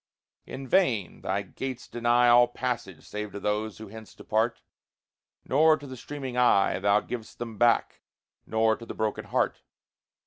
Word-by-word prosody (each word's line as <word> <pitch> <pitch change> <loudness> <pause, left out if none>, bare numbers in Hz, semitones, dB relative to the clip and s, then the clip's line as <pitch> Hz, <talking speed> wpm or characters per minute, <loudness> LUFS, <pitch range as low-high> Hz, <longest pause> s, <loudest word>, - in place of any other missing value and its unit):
In 135 0 -7
vain! 125 - +1
Thy 100 +2 -1
gates 130 +6 -6
deny 120 +1 +2
All 120 0 +7
passage 120 -7 -4
save 105 -1 -5
to 100 - -5
those 105 +1 -2
who 110 -2 -10
hence 110 0 -12
depart. 110 +2 -1 0.9
Nor 155 +3 +4
to 145 - -11
the 130 -2 -8
streaming 135 0 -6
eye 110 -7 +3
Thou 100 +2 +3
givest 115 -1 -7
them 115 -3 -7
back, 120 -1 +2 0.5
nor 110 0 +2
to 115 - -10
the - - -7
broken 110 -1 -2
heart. - - 0
115 Hz, 160 wpm, -27 LUFS, 105-125 Hz, 0.9 s, All